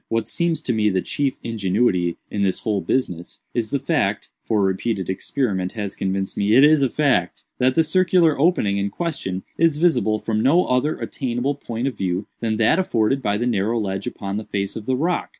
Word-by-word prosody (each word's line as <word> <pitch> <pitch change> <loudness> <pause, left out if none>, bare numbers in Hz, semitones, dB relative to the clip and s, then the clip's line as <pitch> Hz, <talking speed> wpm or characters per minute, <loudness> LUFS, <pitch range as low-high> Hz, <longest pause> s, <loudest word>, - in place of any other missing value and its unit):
What 115 -1 -1
seems 170 +5 -1
to 125 - 0
me 105 -1 +2
the 95 -2 0
chief 140 -2 -1
ingenuity 95 -5 0
in 100 - -2
this 95 -2 0
whole 105 -3 -1
business, 90 -3 -2
is 115 -2 -1
the 140 - 0
fact - - -1
(for 105 -3 +1
repeated 95 0 -1
experiment 95 -3 -2
has 105 -4 -4
convinced 95 0 -2
me 105 +2 +2
it 135 - +7
is 150 0 +6
a 135 - +2
fact) 130 - 0 0.2
that 130 0 +2
the 165 - +4
circular 175 -3 +3
opening 105 - +2
in 100 0 -1
question 100 - -4 0.2
is 165 -2 +3
visible 130 -10 +2
from 110 0 -1
no 165 +9 +4
other 125 +5 +1
attainable 130 +1 -2
point 120 -3 -5
of 135 - -3
view 95 +1 -1
than 110 -2 -1
that 115 +10 +3
afforded 135 -6 +1
by 105 -4 0
the 120 - -1
narrow 115 0 0
ledge 95 -2 -3
upon 100 0 -4
the 110 - -4
face 100 -1 -3
of 110 -1 -7
the 130 - +2
rock. 170 +7 -1
115 Hz, 205 wpm, -22 LUFS, 100-140 Hz, 0.2 s, it